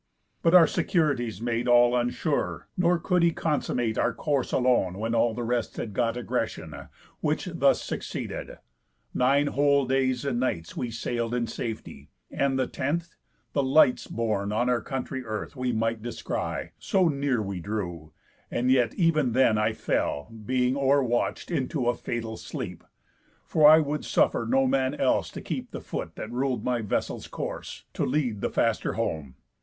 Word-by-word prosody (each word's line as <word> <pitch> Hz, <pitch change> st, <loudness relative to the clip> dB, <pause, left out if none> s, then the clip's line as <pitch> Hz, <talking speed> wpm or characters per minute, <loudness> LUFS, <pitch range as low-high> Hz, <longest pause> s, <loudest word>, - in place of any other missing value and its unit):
But 165 Hz, +2 st, +4 dB
our 175 Hz, -2 st, +9 dB
securities 135 Hz, -, 0 dB
made 120 Hz, 0 st, -1 dB
all 120 Hz, 0 st, +5 dB
unsure; 125 Hz, +5 st, -1 dB
Nor 175 Hz, -1 st, +3 dB
could 180 Hz, +2 st, +1 dB
he 170 Hz, -, +5 dB
consummate 135 Hz, -8 st, -1 dB
our -, -, +1 dB
course 140 Hz, -4 st, -1 dB
alone, 120 Hz, -8 st, +2 dB
When 115 Hz, +2 st, -2 dB
all 115 Hz, -1 st, +2 dB
the 120 Hz, -, -3 dB
rest 120 Hz, 0 st, -1 dB
had 105 Hz, -, -4 dB
got 115 Hz, +2 st, 0 dB
egressión; 125 Hz, -, -4 dB, 0.3 s
Which -, -, -1 dB
thus -, -, +3 dB
succeeded: -, -, -5 dB, 0.6 s
Nine 140 Hz, +3 st, +3 dB
whole 140 Hz, -1 st, +3 dB
days 130 Hz, 0 st, +1 dB
and 130 Hz, -4 st, 0 dB
nights 85 Hz, -10 st, -2 dB
We 120 Hz, -, -2 dB
sail'd 115 Hz, +1 st, -2 dB
in 120 Hz, -1 st, 0 dB
safety; 110 Hz, -, -6 dB, 0.2 s
and 135 Hz, -1 st, +1 dB
the 130 Hz, -, +2 dB
tenth, 165 Hz, +7 st, -3 dB, 0.4 s
the 140 Hz, -, +2 dB
lights 135 Hz, -1 st, +4 dB
Borne 105 Hz, -3 st, -1 dB
on 120 Hz, +4 st, +1 dB
our 120 Hz, -1 st, +1 dB
country 130 Hz, +1 st, -4 dB
earth 110 Hz, +1 st, -5 dB
we 125 Hz, -1 st, -1 dB
might 115 Hz, -1 st, -1 dB
descry, 120 Hz, 0 st, -4 dB
So 185 Hz, -2 st, +2 dB
near 140 Hz, -4 st, 0 dB
we 100 Hz, -3 st, -3 dB
drew; 85 Hz, -5 st, -4 dB, 0.4 s
and 125 Hz, +2 st, +1 dB
yet 125 Hz, -3 st, +3 dB
ev'n 155 Hz, -, +2 dB
then 130 Hz, -2 st, +4 dB, 0.2 s
fell 70 Hz, -, -1 dB
I, -, -, -12 dB
Being 125 Hz, +3 st, 0 dB
overwatch'd, 135 Hz, 0 st, +1 dB
into 135 Hz, -4 st, -1 dB
a 120 Hz, -, +4 dB
fatal 115 Hz, -1 st, -4 dB
sleep, -, -, -6 dB, 0.6 s
For 150 Hz, -1 st, +6 dB
I 155 Hz, -, +9 dB
would 150 Hz, -1 st, -1 dB
suffer 115 Hz, -, +2 dB
no 135 Hz, +2 st, +3 dB
man 130 Hz, 0 st, +1 dB
else -, -, +1 dB
to -, -, -8 dB
keep -, -, -4 dB
The -, -, -6 dB
foot -, -, -6 dB
that 110 Hz, -, -6 dB
rul'd 130 Hz, +1 st, -1 dB
my 125 Hz, -2 st, 0 dB
vessel's 105 Hz, -, -2 dB
course, -, -, -6 dB
to -, -, -1 dB
lead 125 Hz, -7 st, 0 dB
The -, -, 0 dB
faster -, -, 0 dB
home. 70 Hz, -5 st, -3 dB
125 Hz, 165 wpm, -27 LUFS, 115-140 Hz, 0.6 s, our